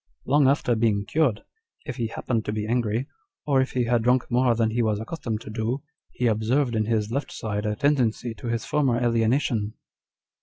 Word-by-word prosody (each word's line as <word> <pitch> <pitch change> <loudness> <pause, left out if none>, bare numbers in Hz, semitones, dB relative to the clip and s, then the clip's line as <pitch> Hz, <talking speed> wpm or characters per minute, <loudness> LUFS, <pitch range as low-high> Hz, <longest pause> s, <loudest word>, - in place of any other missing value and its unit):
Long 140 0 +4
after 135 -3 +2
being 110 -3 +1
cured, 135 -5 +1 0.4
if 135 -5 -5
ho 120 - -1
happened 115 -3 -1
to - - -2
be 105 0 -2
angry, 115 +1 0 0.4
or 140 -3 +3
if 130 - -2
he 125 - +1
had 120 0 +2
drunk 125 +2 +2
more 120 -1 +3
than 110 -1 +1
he 120 +2 0
was 110 -2 +1
accustomed 115 -3 -4
to 110 - -8
do, 115 +5 -2 0.3
he 125 - -3
observed 120 +3 +1
in 110 -1 +1
his 110 -1 0
left 140 +2 -2
side 105 -1 -3
a 105 - 0
tendency 125 -3 +1
to 115 - -8
his 115 0 -2
former 135 -5 +1
alienation." 115 -2 +1
115 Hz, 195 wpm, -25 LUFS, 110-130 Hz, 0.4 s, Long